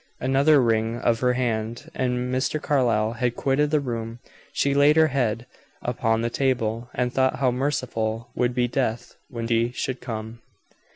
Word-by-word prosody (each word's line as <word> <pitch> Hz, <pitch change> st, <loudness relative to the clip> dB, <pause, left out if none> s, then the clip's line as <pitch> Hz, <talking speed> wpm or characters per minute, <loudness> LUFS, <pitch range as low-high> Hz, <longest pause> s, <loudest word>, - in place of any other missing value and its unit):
Another 140 Hz, +3 st, +4 dB
wring 115 Hz, -1 st, +1 dB
of 115 Hz, -1 st, +1 dB
her 125 Hz, 0 st, +2 dB
hand, 120 Hz, +3 st, -2 dB
and 125 Hz, 0 st, -1 dB
Mr. 130 Hz, +4 st, 0 dB
Carlyle 115 Hz, -7 st, +1 dB
had 120 Hz, 0 st, -1 dB
quitted 140 Hz, +2 st, +1 dB
the 150 Hz, 0 st, +2 dB
room. 115 Hz, -4 st, -4 dB, 0.3 s
She 140 Hz, -, +1 dB
laid 145 Hz, +2 st, +5 dB
her 160 Hz, -1 st, +5 dB
head 120 Hz, -4 st, -1 dB, 0.3 s
upon 115 Hz, -2 st, 0 dB
the 120 Hz, 0 st, -1 dB
table, 120 Hz, -3 st, -1 dB
and 125 Hz, 0 st, -1 dB
thought 130 Hz, -1 st, +2 dB
how 130 Hz, -2 st, +1 dB
merciful 120 Hz, -4 st, -2 dB
would 125 Hz, 0 st, 0 dB
be 125 Hz, -1 st, +2 dB
death 120 Hz, -2 st, -2 dB
when 115 Hz, -2 st, -4 dB
he 115 Hz, +1 st, +1 dB
should 130 Hz, -1 st, -3 dB
come. 110 Hz, -1 st, -6 dB
125 Hz, 165 wpm, -24 LUFS, 115-135 Hz, 0.3 s, laid